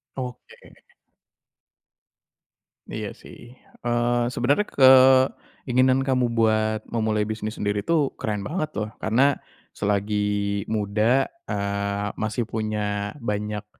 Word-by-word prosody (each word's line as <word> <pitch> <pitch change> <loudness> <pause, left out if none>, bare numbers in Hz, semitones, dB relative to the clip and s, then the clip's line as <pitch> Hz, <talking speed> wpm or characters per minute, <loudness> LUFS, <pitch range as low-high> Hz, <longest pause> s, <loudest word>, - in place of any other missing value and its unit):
Oke. 125 -2 -9 2.1
Iya - - -6
sih, 120 +2 -14 0.2
eee, 120 0 +1
sebenernya 125 +9 +1 0.2
keinginan 130 0 +4
kamu 125 -3 +1
buat 110 -1 +1
memulai 110 -2 0
bisnis 110 0 -5
sendiri 105 0 -1
itu 150 +2 +1
keren 105 -2 -4
banget 155 - -2
loh, 105 0 -2
karena 130 +6 +2 0.3
selagi 105 0 -1
muda, 110 +5 +2 0.2
eee, 100 0 -2
masih 110 +2 -2
punya 105 -2 -2
banyak, 105 -3 -3
110 Hz, 95 wpm, -24 LUFS, 105-125 Hz, 2.1 s, keinginan